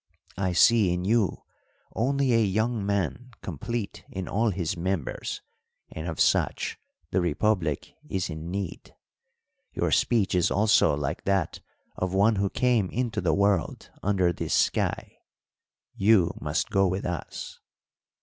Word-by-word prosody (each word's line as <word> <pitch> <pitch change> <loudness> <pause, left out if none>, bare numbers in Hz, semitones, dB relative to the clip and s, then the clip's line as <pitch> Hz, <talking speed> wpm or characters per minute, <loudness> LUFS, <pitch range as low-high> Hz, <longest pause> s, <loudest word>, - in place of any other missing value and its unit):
I 95 -2 0
see 105 +1 +5
in 90 +1 -2
you 110 -1 +1 0.5
only 135 +3 +1
a 115 -1 +4
young 110 +2 0
man 100 +5 -1
complete 105 - -4
in 95 -2 -5
all 110 +3 +1
his 90 -4 -2
members, 90 -3 -3 0.5
and 80 +2 -6
of 80 - -5
such - - +1 0.3
the 95 - +2
republic 85 -2 0 0.2
is 95 +1 -1
in 80 0 -6
need. 95 -1 -5 0.8
Your - - 0
speech 115 -5 +2
is 90 -2 +3
also 105 -7 +3
like 75 +3 -3
that 95 -4 0 0.4
of 95 0 -2
one 105 +2 +4
who 100 0 +1
came 120 -6 +1
into 120 -1 -2
the 85 -3 +2
world 100 -3 0
under 95 -3 +2
this - - -2
sky. - - 0 0.7
You 95 -4 +4
must - - -1
go 95 0 +3
with 95 +2 -2
us." 90 -1 -5
95 Hz, 140 wpm, -27 LUFS, 90-110 Hz, 0.8 s, see